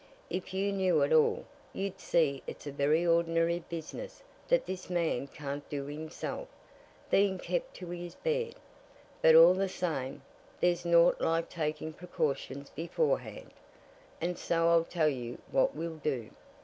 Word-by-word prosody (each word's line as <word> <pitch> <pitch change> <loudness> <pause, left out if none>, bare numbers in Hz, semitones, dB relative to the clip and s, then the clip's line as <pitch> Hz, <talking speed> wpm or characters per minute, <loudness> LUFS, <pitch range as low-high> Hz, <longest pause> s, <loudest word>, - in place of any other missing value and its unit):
"If 185 0 -3
you 195 +1 0
knew 185 -6 +3
it 145 - +2
all, 155 -1 +4 0.3
you'd 195 0 -4
see 145 -8 +1
it's - - -8
a 145 - -4
very 150 +4 +2
ordinary 170 0 +2
business 170 - -7 0.2
that - - +3
this 185 -1 -6
man 165 -7 0
can't 145 0 -6
do 140 -2 -3
himself, 155 - -5 0.6
being 195 -1 +4
kept - - -3
to 180 -2 -7
his 175 0 -6
bed. 475 -1 -1 0.7
But 160 - +7
all 165 +2 +9
the 190 +1 0
same, 145 -7 -3 0.4
there's 175 0 +1
naught 170 0 +5
like 165 0 +1
taking 155 -1 -3
precautions 145 -5 -3
beforehand, 485 - -2 0.7
and 175 +1 -2
so 165 0 +2
I'll 165 -1 +4
tell 165 -3 +1
you 125 -4 -3
what 130 - +2
we'll 165 +1 -4
do. 135 -7 -3
170 Hz, 150 wpm, -31 LUFS, 150-185 Hz, 0.7 s, all